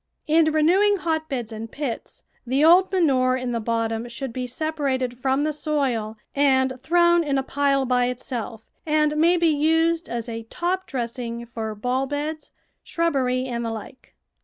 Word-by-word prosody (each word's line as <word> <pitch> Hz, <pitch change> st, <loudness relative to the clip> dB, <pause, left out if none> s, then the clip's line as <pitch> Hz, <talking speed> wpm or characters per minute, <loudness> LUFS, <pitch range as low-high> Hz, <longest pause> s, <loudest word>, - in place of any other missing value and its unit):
In 320 Hz, +1 st, +4 dB
renewing 365 Hz, +7 st, +4 dB
hotbeds 315 Hz, -, -2 dB
and 225 Hz, +1 st, -7 dB
pits, 275 Hz, -5 st, -5 dB, 0.2 s
the 270 Hz, +5 st, +3 dB
old 360 Hz, +3 st, +6 dB
manure 260 Hz, -9 st, +2 dB
in 255 Hz, -1 st, -3 dB
the 235 Hz, -, -1 dB
bottom 230 Hz, +1 st, -2 dB
should 240 Hz, +1 st, -5 dB
be 250 Hz, 0 st, -3 dB
separated 265 Hz, -3 st, -2 dB
from 265 Hz, +2 st, +1 dB
the 305 Hz, 0 st, 0 dB
soil 265 Hz, -8 st, -1 dB, 0.2 s
and 265 Hz, -2 st, +3 dB
thrown 345 Hz, +2 st, +4 dB
in 280 Hz, -3 st, 0 dB
a 270 Hz, -, 0 dB
pile 275 Hz, 0 st, +1 dB
by 250 Hz, -1 st, +2 dB
itself, 240 Hz, -3 st, -5 dB, 0.2 s
and 305 Hz, -1 st, +1 dB
may 335 Hz, +3 st, +4 dB
be 335 Hz, -1 st, +3 dB
used 325 Hz, +2 st, +2 dB
as 235 Hz, -1 st, -4 dB
a 230 Hz, -1 st, -5 dB
top 365 Hz, +2 st, -2 dB
dressing 235 Hz, -2 st, -4 dB
for 225 Hz, -2 st, -5 dB
bulb 255 Hz, +5 st, -1 dB
beds, 300 Hz, +2 st, -4 dB, 0.3 s
shrubbery, 260 Hz, -6 st, 0 dB
and 235 Hz, -2 st, -3 dB
the 230 Hz, -, -2 dB
like. 225 Hz, +3 st, -9 dB
270 Hz, 160 wpm, -23 LUFS, 240-315 Hz, 0.3 s, old